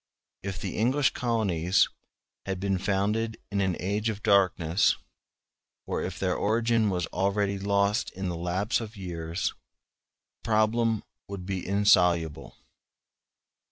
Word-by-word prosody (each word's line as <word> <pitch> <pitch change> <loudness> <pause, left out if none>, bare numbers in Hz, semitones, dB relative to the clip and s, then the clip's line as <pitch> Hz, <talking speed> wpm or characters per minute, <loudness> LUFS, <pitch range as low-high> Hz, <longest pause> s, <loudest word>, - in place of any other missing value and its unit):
If 95 -3 -5
the - - -4
English 130 +6 +3
colonies 100 -7 +2 0.6
had 95 -1 -2
been 95 -1 0
founded 105 +4 0
in 100 0 0
an 95 -3 0
age 105 +4 -1
of 105 -1 -5
darkness, 95 -2 +3 0.9
or - - -2
if 90 0 -4
their 90 -1 0
origin 115 0 +2
was 90 -3 -1
already 100 +1 0
lost 100 +2 +1
in 95 0 -4
the 90 - -2
lapse 90 +7 -1
of 110 -1 -8
years, 85 -2 -3 0.9
the - - -20
problem 110 0 +2 0.2
would 95 -2 -7
be 95 -1 -3
insoluble. 90 -5 +2
100 Hz, 125 wpm, -27 LUFS, 90-110 Hz, 0.9 s, English